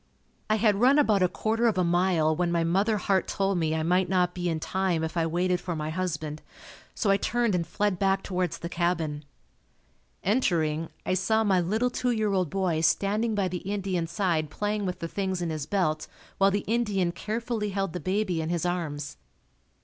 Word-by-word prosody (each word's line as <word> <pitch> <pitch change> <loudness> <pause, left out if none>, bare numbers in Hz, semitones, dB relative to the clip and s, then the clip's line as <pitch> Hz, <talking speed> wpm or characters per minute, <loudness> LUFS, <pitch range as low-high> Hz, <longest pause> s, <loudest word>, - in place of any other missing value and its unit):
I 215 - +4
had 215 -2 +3
run 265 +4 +6
about 215 -9 +3
a 180 - +5
quarter 225 +5 0
of 220 - +1
a 185 - +3
mile 170 -2 +2
when 175 +1 0
my 170 -1 +1
mother 195 +6 +2
heart 190 -1 +1
told 195 -2 0
me 160 -1 0
I 160 - -1
might 180 +3 +2
not 180 -2 +2
be 175 -1 -2
in 160 -1 -1
time 185 -1 -1
if 160 +1 -3
I 165 -1 +1
waited 180 +2 0
for 175 -2 -3
my 155 0 -3
husband, 160 -4 -3 0.5
so 205 - +1
I 195 - +4
turned 235 +1 0
and 170 -2 0
fled 205 0 -1
back 195 0 +2
towards 180 -3 -2
the 170 - -5
cabin. 165 -4 -1 1.0
Entering, 165 -8 +1 0.2
I - - 0
saw 220 +4 +2
my 190 -4 +3
little 220 +8 0
two 250 0 -1
year 215 -4 +1
old 185 -4 +1
boy 180 -3 0
standing 210 +6 +1
by 200 -2 +1
the 180 0 -3
Indian's 190 -4 -2
side 170 -4 0
playing 205 +3 -2
with 180 - -3
the 165 - -2
things 190 +1 -2
in 170 -2 -2
his 155 -2 -4
belt 155 -5 0 0.3
while 195 0 +5
the 200 0 -1
Indian 210 -6 +1
carefully 220 +3 -3
held 195 -3 -2
the 180 - -3
baby 185 -1 -1
in 160 - -3
his 175 0 -1
arms. 155 -5 -3
185 Hz, 205 wpm, -27 LUFS, 170-205 Hz, 1.0 s, run